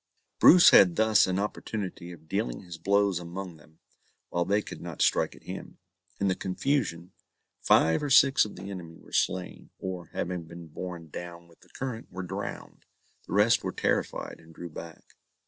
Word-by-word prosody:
Bruce 175 0 +8
had 90 -3 +7
thus 110 -2 +4
an 95 0 -1
opportunity 100 -3 -4
of 80 -2 -14
dealing - - -2
his 85 -2 -9
blows 100 -1 +2
among 90 0 -7
them, 80 +1 -21 0.5
while 85 0 0
they 100 +3 +2
could - - -8
not 85 -3 -8
strike - - +2
at - - -18
him. - - -8 0.4
In 100 - +1
the 95 - +3
confusion, 95 - -2 0.5
five 80 0 +4
or 145 - -2
six 135 0 +6
of 105 - -7
the 100 +2 -8
enemy 85 -4 -8
were - - -18
slain, 90 0 -1
or, 90 -3 -6
having 85 0 -4
been 85 0 -11
borne 85 0 -7
down 85 +2 -8
with 85 - -22
the - - -22
current, 125 -3 -6
were 95 +1 -5
drowned. 95 +3 -7 0.4
The - - -6
rest 105 +3 +4
were - - -2
terrified, - - -2
and 80 0 -17
drew 85 - -7
back. 80 +1 -10
90 Hz, 180 wpm, -28 LUFS, 85-100 Hz, 0.5 s, Bruce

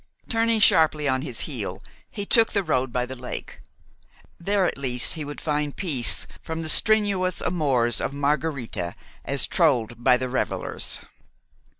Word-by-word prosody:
Turning 225 -1 +1
sharply 155 -7 +4
on 130 -1 +1
his 130 -5 -3
heel, 105 - -4 0.3
he 205 -2 -5
took 225 +2 +3
the 200 -2 +1
road 130 -6 0
by 125 +1 -1
the 130 +1 -7
lake. 125 0 -7 0.8
There 195 +2 +1
at - - -1
least 125 -4 0
he 155 - -5
would 145 0 -7
find 150 -2 -2
peace 140 - +1 0.2
from 160 0 -5
the 155 - -1
strenuous 200 -2 +3
amours 135 -9 +1
of - - -2
Margharita 140 - -2 0.3
as - - +1
trolled 120 0 +1
by 125 0 +5
the 130 - -3
revelers. 130 +1 -2
145 Hz, 155 wpm, -24 LUFS, 125-180 Hz, 0.8 s, by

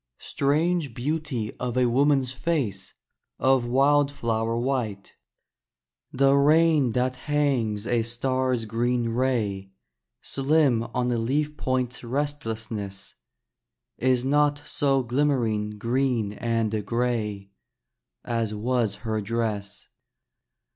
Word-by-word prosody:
Strange 150 -1 0
beauty 140 -5 -3
of 125 0 -3
a 125 - +4
woman's 135 +1 +2
face 130 - -2 0.4
Of 130 -2 +2
wildflower 130 -4 +2
white! 120 -6 -2 1.0
The 135 +1 +3
rain 150 -2 +4
that 130 0 0
hangs 130 -8 0
a 120 -1 +1
star's 125 +1 -1
green 120 +2 0
ray 110 -6 -1 0.5
Slim 140 -3 +2
on 125 0 +1
a 120 - 0
leaf 145 +6 -1
point's 130 -3 -2
restlessness, 115 -7 -4 0.9
Is 130 0 +2
not 145 +1 +2
so 135 -2 +1
glimmering 120 -5 0
green 120 -2 0
and 110 -2 -1
gray 105 -4 -2 0.7
As 115 -3 -1
was 115 -1 0
her 110 -1 -1
dress. 105 -2 -3
125 Hz, 100 wpm, -25 LUFS, 115-140 Hz, 1.0 s, a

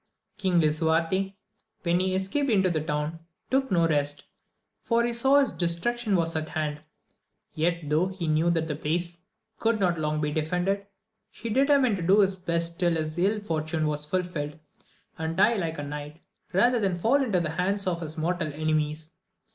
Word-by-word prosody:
King 185 -4 +1
Lisuarte, 165 +5 +1 0.5
lyhen 170 +1 +3
he 185 0 0
escaped 195 +10 0
into 190 -5 +3
the 155 -2 0
town, 150 +1 -2 0.3
took 265 0 +2
no 170 -4 +3
rest, 145 -2 0 0.6
for 235 0 +2
he 240 - -1
saw 265 +4 +4
his 275 - +1
destruction 200 +6 0
was 165 -2 0
at 155 0 -2
hand, 150 -1 -2 0.7
yet, 170 +1 0
though 155 +5 +2
he 185 -3 -5
knew 155 +2 +2
that 165 -2 +1
the 150 - -2
place 170 +3 -2 0.4
could 225 -1 +1
not 175 -4 +1
long 150 0 -1
be 150 -1 -1
defended, 180 +6 -1 0.4
he 230 - -6
determined 270 -3 +3
to - - -5
do 190 +5 +5
his 195 -1 +2
best 170 -1 -2
till 175 -2 +2
his 155 -1 -2
ill 205 +4 +2
fortune 160 -4 -1
was 150 -1 -1
fulfilled, 155 -2 -3 0.6
and 160 +1 -3
die 235 - +5
like 165 -5 -2
a 145 - -4
knight, 150 +2 -7 0.3
rather 240 +6 +3
than 195 -4 +1
fall 235 +11 +2
into 210 -8 +1
the 160 -3 -2
hands 195 +4 -1
of 175 -2 -1
his 160 -1 -6
mortal 165 0 -1
enemies. 155 0 -1
170 Hz, 180 wpm, -27 LUFS, 155-195 Hz, 0.7 s, do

